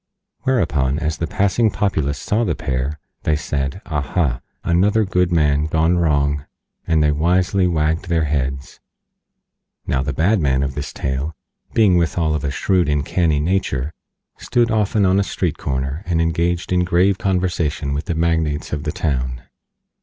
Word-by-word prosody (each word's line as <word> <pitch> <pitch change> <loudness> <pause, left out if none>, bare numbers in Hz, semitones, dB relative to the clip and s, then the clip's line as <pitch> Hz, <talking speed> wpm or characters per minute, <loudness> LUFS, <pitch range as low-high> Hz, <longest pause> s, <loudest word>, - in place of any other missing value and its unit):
Whereupon, 75 - +1
as 80 0 -2
the 80 - -2
Passing 100 +5 +2
Populace 80 -10 -1
saw 110 +3 0
the - - 0
pair, 65 +3 -2 0.2
they 75 - +1
said: 70 +3 -3
"Aha! 75 -3 -1 0.2
Another 100 +5 +2
good 90 -2 +1
man 75 -3 +2
gone 80 +2 +2
wrong," 70 -3 +1 0.4
and 80 -2 +3
they 75 - +3
Wisely 90 +5 +2
Wagged 80 +1 0
their 85 -2 +2
Heads. 70 -2 -2 1.1
Now 65 - 0
the 70 - -2
Bad 90 - +2
Man 70 -3 +1
of 70 -1 -2
this 75 +1 -5
tale, 70 +4 -3 0.4
being 100 -6 +5
withal 80 -2 +1
of 75 -2 -2
a 70 - 0
shrewd 90 +4 +1
and 75 -1 +1
canny 80 -4 +1
Nature, 75 -4 -1 0.5
stood 120 -1 +1
often 105 -1 +2
on 95 +1 +3
a - - +2
street 90 -5 -2
corner, 70 +3 -2
and 85 -2 +1
engaged 85 +2 0
in 90 0 +3
grave 90 +2 +2
conversation 85 -7 -1
with 70 +2 -3
the 85 - -2
Magnates 80 -2 0
of 75 0 -3
the 75 - -1
town. 65 -5 -2
80 Hz, 160 wpm, -20 LUFS, 70-90 Hz, 1.1 s, being